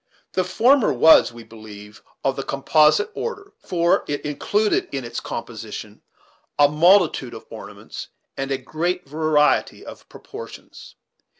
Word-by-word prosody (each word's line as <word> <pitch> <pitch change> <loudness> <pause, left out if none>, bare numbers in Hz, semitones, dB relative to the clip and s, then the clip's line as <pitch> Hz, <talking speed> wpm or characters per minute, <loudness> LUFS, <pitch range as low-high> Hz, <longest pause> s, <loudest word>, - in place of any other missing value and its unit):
The 185 - 0
former 235 +7 +3
was, 145 +3 +6
we 115 0 -12
believe, 105 -2 -13 0.2
of 135 -1 0
the 135 - -3
composite 150 - +2
order; 415 -4 -6
for 170 -1 +1
it 145 0 -4
included 205 +8 0
in 135 -3 -4
its 120 - -5
composition - - -8 0.6
a 145 - +6
multitude 155 -4 +3
of - - -11
ornaments - - -9 0.3
and 135 0 -4
a 135 - 0
great 175 +3 -3
variety 150 0 +1
of - - -12
proportions. - - -12
150 Hz, 130 wpm, -22 LUFS, 135-185 Hz, 0.6 s, was